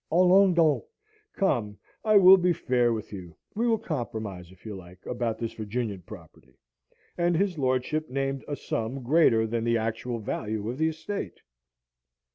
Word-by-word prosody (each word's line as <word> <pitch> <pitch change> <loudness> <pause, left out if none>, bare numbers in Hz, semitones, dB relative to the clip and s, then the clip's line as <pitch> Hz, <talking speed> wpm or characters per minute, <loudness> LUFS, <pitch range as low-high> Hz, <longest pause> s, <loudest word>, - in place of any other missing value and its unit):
Allons 185 +2 +5
donc! 160 -3 +3 0.5
Come, 115 - 0 0.3
I 215 -1 +5
will 190 0 +9
be 180 -1 +2
fair 125 -5 +1
with 110 -2 -5
you! 90 -5 -9 0.2
We 230 +3 0
will 225 -1 +3
compromise, 110 - -5
if 95 +2 -20
you 110 - -5
like, 90 0 -13
about 120 -2 -2
this 115 -1 -4
Virginian 110 -2 -4
property!" 65 -5 -14 0.6
and 170 -1 +2
his 190 -3 0
lordship 130 +4 0
named 135 +1 -2
a 145 - -3
sum 125 +1 -4
greater 120 -5 +4
than 115 +1 -2
the 115 0 +2
actual 115 +2 -3
value 110 -1 -4
of 130 - -8
the 160 - +3
estate. 180 +6 -6
125 Hz, 160 wpm, -27 LUFS, 110-165 Hz, 0.6 s, will